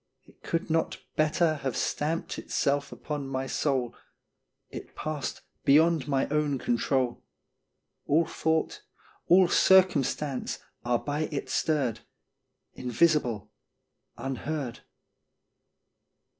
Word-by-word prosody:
It - - -23
could 165 +1 -2
not 165 0 +1 0.2
better 155 +1 +2
Have 135 -2 -2
stamped 160 +3 -1
itself 140 0 0
upon 145 -2 -5
my 135 0 -2
soul 130 -3 0 0.8
It - - -9
passed 150 -5 -4 0.2
beyond 155 0 +4
my 135 -2 +1
own 150 -2 +1
control. 125 +1 0 0.8
All 160 +3 +4
thought, 160 0 -1 0.5
all 180 +1 +6
circumstance 150 -8 +3 0.3
are 120 0 +2
by 150 +4 -2
it 145 - -4
stirred, 135 -8 0 0.7
Invisible, 125 - +1 0.7
unheard. 135 -1 -4
145 Hz, 95 wpm, -28 LUFS, 130-155 Hz, 0.8 s, all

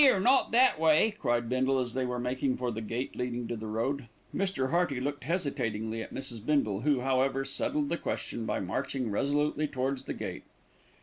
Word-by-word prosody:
"'Ere, 260 -8 +6
not 255 +7 +4
that 250 -7 +5
way," 160 +7 +5
cried 120 - +1
Bindle, 130 +2 +2
as 125 -2 -1
they 130 0 0
were 125 0 -2
making 130 +2 0
for 125 -1 -1
the 110 0 -4
gate 115 +4 -3
leading 125 -1 -2
to 120 - -3
the 110 0 -6
road. 115 +4 -1 0.3
Mr. 185 -10 0
Hearty 170 -6 +2
looked 145 0 -3
hesitatingly 115 - -1
at - - -7
Mrs. 120 -5 -5
Bindle, 110 -8 +1
who, 140 -1 +2
however, 135 +1 +1
settled 140 +1 -1
the 170 - 0
question 115 -7 -3
by - - 0
marching 110 +5 -2
resolutely 145 +6 +1
towards 135 -1 -2
the - - -4
gate. - - -5
130 Hz, 190 wpm, -30 LUFS, 120-145 Hz, 0.3 s, Ere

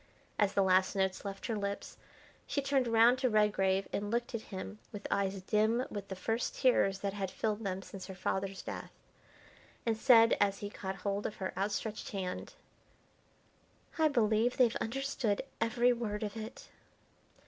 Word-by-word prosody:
As 205 -2 +3
the 195 - +3
last 185 +1 +3
notes 190 0 0
left 195 -1 -5
her 230 - -1
lips, 200 -1 -4 0.5
she - - 0
turned 275 -2 +1
round 230 +2 +5
to 260 -1 +2
Redgrave 195 -3 +2
and 205 0 -2
looked 235 +2 -1
at 230 - -2
him 105 - -6
with 205 -1 -8
eyes 195 -1 0
dim 220 +5 +2
with 200 -2 -5
the 190 - -5
first 225 +5 -2
tears 195 -7 +3
that 200 -1 -1
had 195 -2 -3
filled 215 +2 -2
them 190 -1 -3
since 185 -1 -9
her 190 - -7
father's 190 +1 -2
death, - - -6 1.0
and 230 -1 +2
said, 230 -1 +6
as 200 -1 +3
he 205 0 -6
caught 190 -2 -5
hold 200 0 0
of 210 - -7
her 190 - -4
outstretched 210 +3 -2
hand: 185 -2 -4 1.5
"I 315 - +6
believe 230 -3 +2
they've 240 -3 +4
understood 240 -3 -1 0.2
every 240 +2 +3
word 220 -3 -3
of 210 0 -4
it." 220 +2 -7
210 Hz, 170 wpm, -33 LUFS, 195-230 Hz, 1.5 s, said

